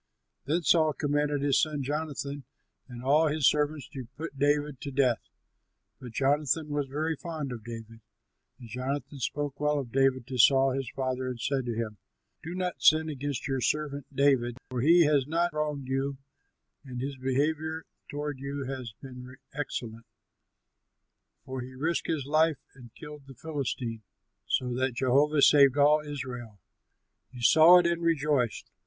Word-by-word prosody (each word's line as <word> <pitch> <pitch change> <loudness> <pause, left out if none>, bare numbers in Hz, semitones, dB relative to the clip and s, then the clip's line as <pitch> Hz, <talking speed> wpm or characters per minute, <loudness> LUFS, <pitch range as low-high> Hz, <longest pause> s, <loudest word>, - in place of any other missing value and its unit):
Then 165 +5 0
Saul 155 -2 +4
commanded 145 -1 0
his 140 -1 +3
son 150 -3 -1
Jonathan 145 -1 -4 0.4
and 120 -1 -9
all 150 +4 +4
his 150 -2 +2
servants 150 -1 +1
to 130 -5 -8
put 160 -2 -6
David 145 -1 +1
to 145 - -5
death. 130 -5 +2 0.8
But 125 -3 -10
Jonathan 145 +3 +1
was 145 -1 -1
very 155 +4 -2
fond 155 -4 -5
of 115 -3 -7
David. 115 0 -9 0.6
And 120 - -11
Jonathan 135 +4 -4
spoke 145 +2 -3
well 150 0 +1
of 130 -5 -4
David 135 -1 +2
to 130 0 -5
Saul 135 +2 +6
his 135 -2 -3
father 130 -1 -3
and 125 -2 -5
said 130 +1 -1
to 120 - -2
him, 110 -2 -4 0.4
"Do 170 +2 -6
not 180 -1 -3
sin 155 +1 +5
against 145 -1 -4
your 135 -2 -1
servant 145 +1 -1
David, 135 -3 +2
for 125 -2 -2
he 170 +4 +6
has 145 -3 +2
not 170 +2 0
wronged 150 -3 -2
you 135 +1 -1 0.7
and 130 -3 -7
his 135 +2 -4
behavior 155 +5 -1 0.3
toward 145 -1 -4
you 140 +1 -4
has 130 -4 -6
been 125 -1 -10 0.2
excellent; 115 -5 -5 1.4
for 130 -1 -5
he 130 +1 -9
risked 155 +2 -1
his 155 -5 -1
life 155 +1 +3 0.2
and 125 -3 -14
killed 150 -2 -11
the 135 - -12
Philistine, 130 -7 -4 0.5
so 125 -1 0
that 130 0 -1
Jehovah 140 +4 +3
saved 140 -2 +6
all 150 +1 +5
Israel. 130 -7 -7 0.7
You 125 -2 -9
saw 160 +8 +8
it 175 - +3
and 170 0 +1
rejoiced. 150 -7 0
140 Hz, 160 wpm, -28 LUFS, 130-150 Hz, 1.4 s, saw